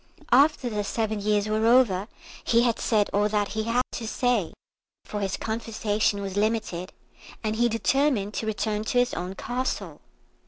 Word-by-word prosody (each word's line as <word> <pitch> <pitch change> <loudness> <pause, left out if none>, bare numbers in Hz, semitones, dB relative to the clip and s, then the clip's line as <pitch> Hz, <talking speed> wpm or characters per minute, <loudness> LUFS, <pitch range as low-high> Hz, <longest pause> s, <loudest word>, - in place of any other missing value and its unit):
After 275 +1 +4
the 210 -3 -2
seven 220 0 -2
years 210 0 +1
were 215 +1 0
over 225 -6 +4 0.4
he 235 0 +3
had 235 -2 +1
said 210 -3 +2
all 205 +1 +2
that 205 -1 0
he 220 0 -3
had 240 +2 +2
to 225 - -5
say, 240 -7 0 0.5
for 210 - -4
his 195 -2 -2
conversation 215 -2 -1
was 195 -1 -5
limited, 205 -4 -1 0.5
and 215 0 -1
he 240 +1 +2
determined 230 -2 +1
to 220 - -3
return 215 0 -1
to 245 - -1
his 245 0 +3
own 180 +2 -4
castle. 205 - -3
215 Hz, 165 wpm, -26 LUFS, 205-235 Hz, 0.5 s, After